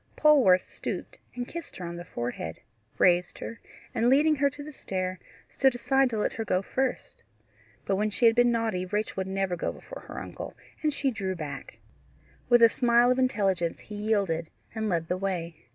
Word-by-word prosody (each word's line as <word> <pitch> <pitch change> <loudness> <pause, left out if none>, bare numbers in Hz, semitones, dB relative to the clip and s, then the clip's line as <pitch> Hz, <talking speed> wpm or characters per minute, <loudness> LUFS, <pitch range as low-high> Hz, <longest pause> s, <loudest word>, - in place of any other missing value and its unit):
Polwarth 260 -13 +5
stooped - - -6 0.2
and 245 0 -4
kissed 335 -1 -8
her 180 - -6
on 170 0 -5
the 175 - -6
forehead, 120 - -5 0.4
raised 175 -1 +3
her, 230 - -7 0.3
and 235 0 +2
leading 300 +3 +4
her 280 +1 +3
to 290 +1 -9
the 305 +1 -9
stair, 185 -6 -3 0.3
stood 265 -2 +2
aside 270 +1 +2
to 225 - -3
let 210 - 0
her 225 - -3
go 185 -3 0
first. 265 +5 -2 0.6
But 195 - +1
when 210 +1 +1
she 225 +3 0
had 225 - +7
been 245 +1 +4
naughty 225 -6 0
Rachel 210 +3 -1
would 190 0 -1
never 190 -1 -1
go 170 - -2
before - - -11
her - - -8
uncle, - - -7 0.3
and 305 - +2
she 275 -1 0
drew 195 -5 -3
back. 145 -5 -7 0.7
With 240 -1 +6
a - - +11
smile 240 +1 +4
of 255 - +1
intelligence 195 -9 +1
he 210 - -10
yielded 200 -6 0 0.2
and 220 -1 -2
led 165 -3 0
the 180 - -1
way. 180 -4 -3
210 Hz, 195 wpm, -28 LUFS, 185-245 Hz, 0.7 s, a